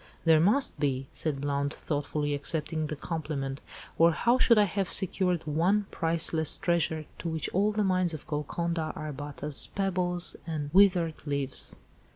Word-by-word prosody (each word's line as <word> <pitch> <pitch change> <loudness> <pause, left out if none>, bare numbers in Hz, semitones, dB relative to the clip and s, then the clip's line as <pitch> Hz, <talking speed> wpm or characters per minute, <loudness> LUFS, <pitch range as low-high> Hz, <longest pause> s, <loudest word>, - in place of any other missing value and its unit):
"There 160 -1 +6
must 215 - +2
be," 135 -3 -1
said 145 -4 -2
Blount 140 0 -1
thoughtfully, 145 0 -2
accepting 155 +2 -1
the 155 - -4
compliment, 140 -4 -4 0.4
"or 165 0 +6
how 240 +8 +2
should 235 -3 +5
I 210 - +6
have 195 -1 -2
secured 180 -3 +1
one 175 +7 +1
priceless 165 -1 +2
treasure 170 -4 0
to 170 - -4
which 160 -2 -2
all 205 +3 +1
the 210 0 0
mines 185 -3 +1
of 150 - -10
Golconda 160 +2 -3
are 155 -1 -5
but 145 +1 -8
as 150 -2 +4
pebbles 180 -2 0
and 150 -3 -4
withered 180 -5 +3
leaves." 140 -2 -1
160 Hz, 160 wpm, -28 LUFS, 145-180 Hz, 0.4 s, There